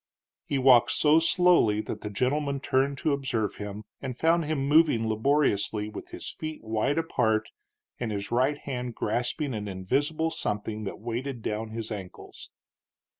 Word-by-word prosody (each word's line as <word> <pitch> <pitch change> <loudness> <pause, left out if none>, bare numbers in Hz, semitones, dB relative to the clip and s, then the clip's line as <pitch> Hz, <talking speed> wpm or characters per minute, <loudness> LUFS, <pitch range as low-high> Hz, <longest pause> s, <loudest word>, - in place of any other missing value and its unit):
He 140 - 0
walked 130 -3 +6
so 155 +1 +5
slowly 165 - +4
that - - -6
the 105 - -4
gentleman 140 +6 0
turned 135 0 +1
to 150 +2 0
observe 120 -7 -2
him, 105 +1 -6 0.2
and 130 -3 -5
found 165 +2 +2
him 145 -3 -1
moving 150 -7 +4
laboriously, 110 -3 +1
with - - -9
his - - -6
feet 155 -1 -7
wide 110 +6 0
apart 110 -9 +1 0.5
and 120 -3 -2
his 100 +1 -4
right 130 +5 +2
hand 125 -4 -5
grasping 120 +6 -1
an 105 -2 -4
invisible 140 +12 -1
something 105 -1 -3
that 95 - -6
weighted 120 +2 -4
down 110 +1 -3
his 115 0 -5
ankles. 95 -4 -8
125 Hz, 155 wpm, -27 LUFS, 110-145 Hz, 0.5 s, walked